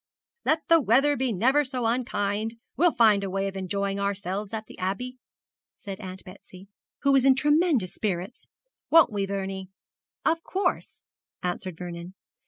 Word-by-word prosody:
'Let 315 +1 +1
the 330 -1 +6
weather 275 +5 +4
be 260 -2 0
never 260 +9 +3
so 255 -3 -2
unkind, 225 -2 -1 0.2
we'll 345 +2 +4
find 215 -6 +4
a 195 - -2
way 195 +1 -1
of 195 - -5
enjoying 195 +1 -2
ourselves 200 0 -2
at 220 -1 -4
the - - -13
Abbey,' 225 +8 -3 0.6
said 195 0 -7
Aunt 185 -2 -8
Betsy, 185 +1 -14 0.3
who 280 - +4
was 270 -2 +5
in 265 -1 +6
tremendous 295 - +2
spirits, 195 0 -4 0.4
'won't 325 -6 +6
we, 200 -2 -1
Vernie?' 195 -1 -4 0.6
'Of 330 0 +2
course,' 390 +2 -2 0.4
answered 180 -1 -3
Vernon. 175 +1 -7
205 Hz, 155 wpm, -26 LUFS, 190-260 Hz, 0.6 s, the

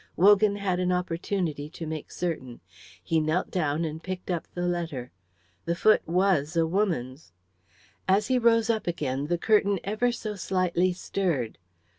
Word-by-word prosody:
Wogan 205 +2 +5
had 195 -3 -1
an 180 0 +1
opportunity 170 -4 -2
to 165 0 -7
make 155 -1 -5
certain. 140 -9 -4 0.4
He 165 - +1
knelt 155 +4 0
down 160 -2 0
and 160 0 -5
picked 185 0 -5
up 170 -2 -2
the 175 0 -1
letter; 165 -8 -3 0.5
the 170 - 0
foot 215 +4 +4
was 175 -3 +2
a 165 - +4
woman's. 160 - -2 0.7
As 195 +2 +3
he 255 +1 +2
rose 230 -1 +4
up 220 -4 -3
again, 145 -5 -2
the 175 +2 +1
curtain 200 0 +3
ever 215 +5 +1
so 225 -3 -4
slightly 185 -1 +1
stirred. 170 - -2
180 Hz, 155 wpm, -27 LUFS, 160-200 Hz, 0.7 s, Wogan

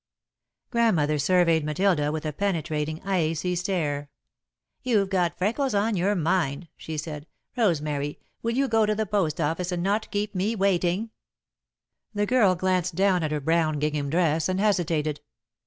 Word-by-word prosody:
Grandmother 165 - +2
surveyed 165 0 +3
Matilda 150 -1 +1
with 155 0 -4
a 155 - -2
penetrating, 155 -4 -2
icy 180 -2 0
stare. 155 -6 -2 0.7
"You've 210 -6 +1
got 175 -2 +1
freckles 230 +6 0
on 210 +2 +1
your 195 +3 +1
mind," 170 -2 0
she 160 -1 -7
said. 150 0 -6 0.3
"Rosemary, 150 - 0 0.2
will 230 +1 -1
you 275 +1 +2
go 225 -3 +2
to 215 - +1
the 220 +1 -1
post 195 -8 0
office 165 +4 -1
and 175 -1 -2
not 205 +3 0
keep 205 0 -2
me 200 +4 0
waiting?" 195 +2 +1 1.0
The 205 0 +1
girl 205 -5 +3
glanced 185 -1 0
at 180 -6 +2
her 150 - 0
brown 160 +1 +1
gingham 150 -1 -1
dress, 165 0 +1
and 185 0 0
hesitated. 165 -7 0
180 Hz, 150 wpm, -25 LUFS, 155-200 Hz, 1.0 s, surveyed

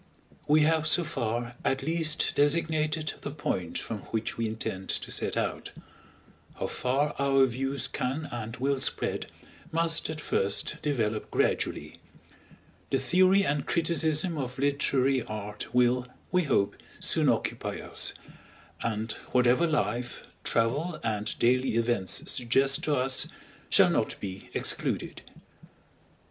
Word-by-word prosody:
We 155 +1 +5
have 160 0 +2
so 175 - +5
far 120 -6 -3
at 135 0 0
least 160 0 +2
designated 155 +1 +1
the - - -4
point 95 - -3
from 110 - -4
which 110 0 -2
we 115 -1 -1
intend 105 -3 -5
to - - -2
set - - -1
out; - - -2 0.9
how - - -3
far 140 +4 0
our 135 -1 +4
views 135 +1 -2
can 140 +3 -3
and 115 -1 -5
will 135 +1 0
spread, - - 0 0.4
must 165 0 +2
at 155 -1 -4
first 100 -9 0
develop 110 -7 -1
gradually. - - -1 0.9
The 135 - +2
theory 185 +8 +4
and 145 -2 -1
criticism 165 0 +1
of 125 -2 -4
literary 135 -1 +2
art 105 -1 -6
will, 125 +1 +2 0.2
we 180 -2 +2
hope, 100 -8 +1 0.2
soon - - +3
occupy - - -1
us; - - +1 0.7
and 110 -1 -2 0.2
whatever 125 +6 +4
life, 125 -6 -2 0.2
travel, 145 +9 0
and 105 -1 -2
daily 125 0 +2
events 115 -5 +1
suggest 135 +3 +2
to 150 - +2
us, 130 0 +3 0.4
shall - - +5
not - - 0
be 95 -1 -7
excluded. - - -1
135 Hz, 130 wpm, -28 LUFS, 115-155 Hz, 0.9 s, We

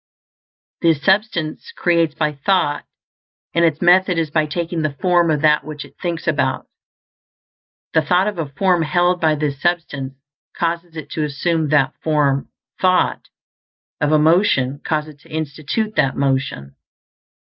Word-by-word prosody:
This 165 -4 +3
Substance 195 - 0
creates 170 -3 +1
by 155 -1 0
thought, 145 0 0 0.7
and 170 - +2
its 160 0 +1
method 180 0 +4
is 160 -3 -1
by 155 -1 +1
taking 170 +1 -3
the 155 -2 -2
form 175 -2 +3
of 150 -2 +1
that 150 -1 +3
which 150 -1 -7
it - - -17
thinks 170 -2 -3
about. 135 -4 0 1.3
The 160 - +4
thought 180 +5 +2
of 205 -5 -3
a 155 -4 -3
form 180 +4 +1
held 175 +3 +1
by 155 -2 +3
this 145 -2 -3
substance 145 -6 -2 0.4
causes 170 0 -2
it 155 -3 -8
to 155 - -2
assume 155 +2 -1
that 140 -3 +3
form; 145 -3 +1
the - - -31
thought 185 -1 +2 0.7
of 150 0 +1
a 155 - +5
motion 150 -4 +2
causes 155 -1 -3
it - - -28
to - - -20
institute 155 +8 -3
that 135 - +2
motion. 130 - -1
155 Hz, 155 wpm, -19 LUFS, 145-175 Hz, 1.3 s, a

